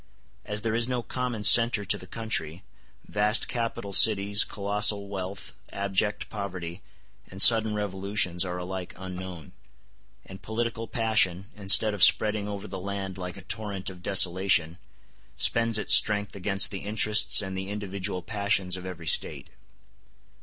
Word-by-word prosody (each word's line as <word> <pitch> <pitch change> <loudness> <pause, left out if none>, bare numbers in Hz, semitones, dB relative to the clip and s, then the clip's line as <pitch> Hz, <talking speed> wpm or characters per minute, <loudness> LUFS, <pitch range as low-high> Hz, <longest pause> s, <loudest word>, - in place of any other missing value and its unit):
As 105 +1 -5
there 115 -1 -2
is 115 +1 -1
no 125 -2 -3
common 125 -4 -5
centre 115 -2 +5
to 100 - 0
the 90 - -11
country, 95 -6 -5 0.4
vast 105 +1 +1
capital 115 -4 -5
cities, 105 0 +5
colossal 100 0 -1
wealth, 95 0 -7 0.2
abject 100 +1 -3
poverty, 95 -4 -7 0.5
and 95 - -11
sudden 110 0 +6
revolutions 95 -3 -2
are 90 -1 -5
alike 90 0 -7
unknown; 90 -3 -9 0.7
and 95 0 -12
political 115 0 -4
passion, 105 -6 0
instead 105 +1 +5
of 100 - -6
spreading 105 +1 +3
over 100 0 -7
the - - -8
land 95 -1 -6
like 90 +1 -7
a 95 - -12
torrent 100 -1 -5
of 90 -1 -15
desolation, 95 -2 +2 0.6
spends 115 -1 +2
its - - +2
strength 105 -1 +3
against 100 +1 +1
the 100 - -5
interests 105 +1 +4
and 95 -1 -6
the 95 +1 -6
individual 100 -2 -5
passions 100 -3 -1
of 90 0 -8
every 85 -3 -9
State. - - -2
100 Hz, 145 wpm, -26 LUFS, 95-105 Hz, 0.7 s, sudden